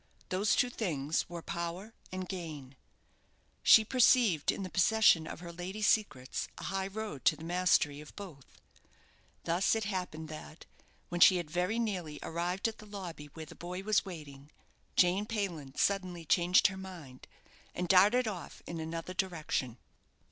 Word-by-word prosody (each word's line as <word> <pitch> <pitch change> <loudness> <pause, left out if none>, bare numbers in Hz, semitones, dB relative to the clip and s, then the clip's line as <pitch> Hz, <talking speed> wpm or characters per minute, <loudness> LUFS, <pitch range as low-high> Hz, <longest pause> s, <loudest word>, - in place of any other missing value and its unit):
Those 195 +4 +2
two 250 - +2
things 160 - -1
were 170 -1 -7
power 170 +6 -5 0.2
and 185 0 -4
gain. 155 -8 -7 0.9
She 220 - +7
perceived 230 - +4
in 195 - -5
the 185 - -5
possession 180 -4 +4
of - - -7
her 170 -1 -8
lady's 190 +5 -4
secrets 135 - 0
a - - -8
high 195 +1 -2
road 200 - -6
to - - +5
the - - -12
mastery 170 -4 +2
of 150 - -13
both. 170 -10 -10 1.0
Thus 175 +6 +2
it 220 - -1
happened 180 -6 -4
that, 155 +1 -10 0.4
when 175 0 -3
she 185 - +8
had 170 -4 -5
very 180 +6 0
nearly 185 -10 -2
arrived 175 +5 -1
at 225 - -6
the 215 - -12
lobby 180 -7 -7
where 160 -1 -7
the - - -12
boy 180 +2 -6
was 215 0 +2
waiting, 150 -6 -10 0.5
Jane 185 +4 +3
Payland 175 -11 -4
suddenly 185 -4 0
changed 175 +3 +4
her 190 -1 +3
mind, 170 -9 -10 0.5
and 180 - -2
darted 205 +7 +5
off 190 -5 -6
in 170 -1 -5
another 165 +2 -5
direction. 155 -10 -2
180 Hz, 160 wpm, -32 LUFS, 160-200 Hz, 1.0 s, she